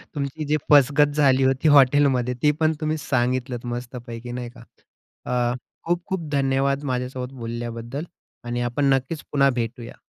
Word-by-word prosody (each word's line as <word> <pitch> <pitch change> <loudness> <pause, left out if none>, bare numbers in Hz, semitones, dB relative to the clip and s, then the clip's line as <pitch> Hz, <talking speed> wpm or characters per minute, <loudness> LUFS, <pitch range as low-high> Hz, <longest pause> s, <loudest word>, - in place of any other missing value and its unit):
तुमची 140 +2 -3
जी 150 +1 +1
फसगत 145 +1 +6
झाली 135 -3 +4
होती 135 +3 +2
हॉटेलमध्ये 135 -3 +4
ती 150 - +5
पण 160 0 +3
तुम्ही 155 0 0
सांगितलत 125 -3 -1
मस्तपैकी 120 -1 -7
नाही 120 0 -5
का. - - -15 0.6
अ, 120 0 0 0.3
खूप-खूप 175 -1 -2
धन्यवाद 140 0 +1
माझ्यासोबत 125 +1 -4
बोलल्याबद्दल 120 +2 -5 0.4
आणि 120 0 -3
आपण 135 +3 +1
नक्कीच 135 +4 -2
पुन्हा 140 -1 +4
भेटूया. 120 -1 -4
130 Hz, 135 wpm, -23 LUFS, 120-145 Hz, 0.6 s, फसगत